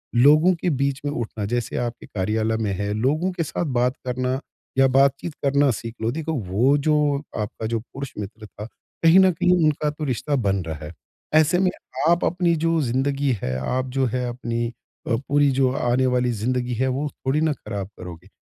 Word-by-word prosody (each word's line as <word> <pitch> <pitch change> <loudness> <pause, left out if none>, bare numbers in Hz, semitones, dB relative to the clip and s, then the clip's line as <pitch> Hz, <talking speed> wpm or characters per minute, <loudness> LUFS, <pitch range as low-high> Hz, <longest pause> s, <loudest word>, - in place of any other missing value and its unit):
लोगों 150 +8 +6
के 175 +2 -1
बीच 140 -2 0
में 145 - 0
उठना 115 -5 -4
जैसे 120 +3 -2
आपके 120 -1 -3
कार्यालय 110 +3 -1
में 110 -2 -1
है, 100 +2 -2
लोगों 150 - +1
के 175 -2 -2
साथ 165 - -3
बात 125 -3 +1
करना 130 +1 -1 0.4
या 135 0 +6
बातचीत 140 +4 +2
करना 140 0 +3
सीख 115 +1 -6
लो। 115 +1 0
देखो, 160 +3 -3
वो 120 +3 +2
जो 150 -1 +2 0.2
आपका 105 +1 -4
जो 115 0 -1
पुरुष 135 +4 -8
मित्र 110 +2 -7
था, 105 0 -9 0.4
कहीं 165 +3 +7
न 190 -1 +6
कहीं 180 +2 +1
उनका 150 0 +1
तो 150 +1 -6
रिश्ता 135 +3 -1
बन 100 -7 +1
रहा 80 -1 -6
है, 75 - -8 0.4
ऐसे 155 +3 +4
में 185 -1 +3 0.4
आप 170 0 +3
अपनी 175 -1 +2
जो 165 +1 +1
ज़िंदगी 135 +2 0
है, 65 0 -1
आप 125 - -1
जो 135 +1 0
है 125 +1 -2
अपनी 120 -1 -3 0.4
अ, 115 - +2
पूरी 145 0 +3
जो 130 -1 +2
आने 125 0 +1
वाली 125 -1 +1
ज़िंदगी 125 +3 -1
है, 130 +3 0
वो 135 +3 -1
थोड़ी 135 +3 -2
ना 160 -1 +2
ख़राब 100 -7 -6
करोगे, 90 0 -9
130 Hz, 195 wpm, -23 LUFS, 115-145 Hz, 0.4 s, कहीं